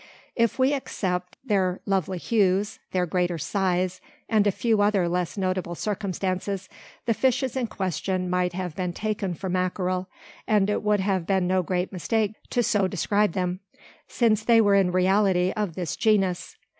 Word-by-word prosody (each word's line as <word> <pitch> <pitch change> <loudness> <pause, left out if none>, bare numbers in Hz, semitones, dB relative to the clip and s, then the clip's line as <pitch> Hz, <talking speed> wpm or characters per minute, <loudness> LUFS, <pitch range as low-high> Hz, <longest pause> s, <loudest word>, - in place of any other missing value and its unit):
If 230 -1 +1
we 260 +2 +3
except 180 -9 -3
their 190 -5 +1
lovely 190 -2 0
hues, 200 0 +1
their 180 -1 0
greater 175 0 0
size, 185 +1 -1 0.3
and 215 -2 +3
a - - +4
few 220 +1 +1
other 205 -4 +3
less 180 +2 -2
notable 185 -2 -1
circumstances, 195 -1 -2 0.4
the 230 - +2
fishes 260 +1 +1
in 255 -3 0
question 185 -1 -2
might 180 0 0
have 180 -3 -4
been 180 -1 -2
taken 205 -3 -2
for 190 - -5
mackerel; 185 0 -1 0.4
and 210 -2 +3
it - - 0
would 210 -1 +2
have 190 -3 0
been 190 -2 +2
no 185 +1 +2
great 180 +2 -2
mistake 210 +4 0 0.2
to 240 - +1
so 200 -3 +2
describe 200 +1 +1
them: 180 0 -1 0.5
since 220 -3 +2
they 230 0 +5
were 205 -2 +4
in 195 -2 +4
reality 185 0 +3
of 205 -6 -2
this 175 -4 -3
genus. 195 -5 +1
190 Hz, 165 wpm, -25 LUFS, 180-210 Hz, 0.5 s, they